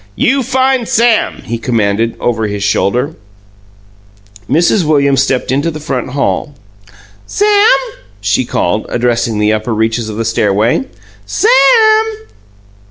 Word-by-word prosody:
"You 270 +2 +1
find 260 -1 0
Sam!" 230 -1 +1
he 115 0 -4
commanded, 115 -1 -1
over 110 -2 -1
his 100 -1 -4
shoulder. 100 +9 0 1.4
Mrs. 170 - +2
Williams 140 -3 +2
stepped 130 -1 -1
into 140 +5 0
the 155 -2 -6
front 130 -5 -4
hall. 145 +1 -2 0.7
"Sam!" 415 -6 +3 0.4
she 105 +5 0
called, 105 -3 -2
addressing 120 -2 -1
the 105 0 +1
upper 110 +1 -2
reaches 110 +1 -1
of 105 - -6
the 115 - -2
stairway. 110 +3 0 0.4
"Sam!" 435 - +3
125 Hz, 120 wpm, -13 LUFS, -, 1.4 s, Sam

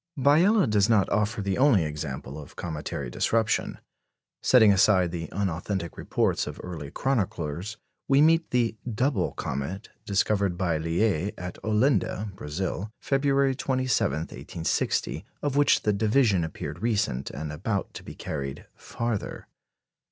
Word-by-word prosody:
Biela 170 - +4
does 105 0 +3
not 105 -4 +4
offer 105 0 0
the 100 +4 -1
only 130 - +5
example 75 -2 -5
of 75 - -13
cometary 75 -7 -5
disruption. 110 - 0 0.6
Setting 110 -5 +6
aside 95 -3 +4
the 85 -2 -5
unauthentic 95 -1 -2
reports - - 0
of - - -7
early 80 -6 -6
chroniclers, 100 - -2 0.3
we 135 0 +4
meet 165 +2 +4
the 120 -3 +1 0.2
"double 130 +6 0
comet" 75 +10 -4 0.2
discovered 100 -2 +1
by 85 -4 0
Liais 90 +3 0
at 90 0 -7
Olinda 110 -2 +1
(Brazil), 95 +5 -4
February 135 0 +2
27, 130 - 0
1860, 80 0 -2 0.2
of 145 -2 -1
which 145 0 +4
the 105 - +2
division 105 -2 +3
appeared 80 - -6
recent, 105 - 0
and 75 +1 -5
about 95 +6 -3
to - - -8
be - - -10
carried 70 -1 -5
farther. 115 -3 -4
100 Hz, 130 wpm, -26 LUFS, 85-120 Hz, 0.6 s, Setting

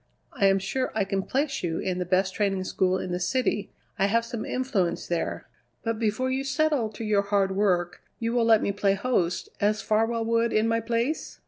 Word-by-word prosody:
I 195 - +3
am 195 0 +4
sure 255 +7 -2
I 220 - +2
can 195 0 -1
place 275 +6 -1
you 165 -2 -2
in 185 -1 -2
the 180 - -1
best 185 +1 +2
training 195 -3 0
school 185 0 +1
in 185 - -4
the 180 - -1
city; 210 0 0 0.3
I 195 - +4
have 230 +3 +1
some 230 -2 -5
influence 240 -9 -1
there. 170 -1 -3 0.4
But 225 -2 -2
before 230 +4 0
you 265 +1 -1
settle 275 -4 +1
to 215 - -6
your 210 -2 +2
hard 200 -1 +1
work 180 -4 +1 0.2
you 230 0 -2
will 240 -2 +2
let 225 -1 +5
me - - +1
play 200 0 +1
host, 190 -6 0
as 210 0 +1
Farwell 225 +1 +1
would 230 0 +1
in 215 +1 +3
my 230 0 +2
place? 235 +6 -2
215 Hz, 210 wpm, -26 LUFS, 195-230 Hz, 0.4 s, let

